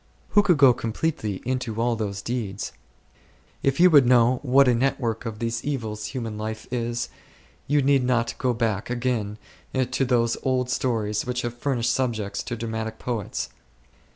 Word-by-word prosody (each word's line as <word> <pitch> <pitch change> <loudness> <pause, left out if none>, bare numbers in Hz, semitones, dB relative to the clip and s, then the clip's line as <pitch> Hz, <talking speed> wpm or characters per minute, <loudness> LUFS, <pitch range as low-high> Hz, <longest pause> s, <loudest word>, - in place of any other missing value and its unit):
Who 205 - +5
could 180 -5 +3
go 135 -3 +7
completely 115 - -2
into 125 -3 -2
all 120 0 +2
those 100 -2 -4
details? 110 -5 -3 0.9
If 135 +2 +1
you 180 +1 +7
would 140 -5 +7
know 125 0 +5
what 135 0 +5
a 125 - +5
network 115 -2 0
of 110 -2 -5
these 115 +1 -2
evils 110 -7 -3
human 115 -5 -5
life 110 +1 -4
is, 120 0 -2 0.6
you 145 0 +3
need 135 -1 +4
not 120 -2 +1
go 130 -1 +1
back 110 -3 -1
again 120 -4 -1 0.5
to - - +1
those 120 -2 +2
old 125 -1 0
stories 110 -4 -1
which 125 0 -2
have 120 -1 -2
furnished 120 -2 0
subjects 115 -6 -1
to 120 - -4
dramatic 110 -1 -4
poets. 115 -5 -3
120 Hz, 160 wpm, -25 LUFS, 110-130 Hz, 0.9 s, go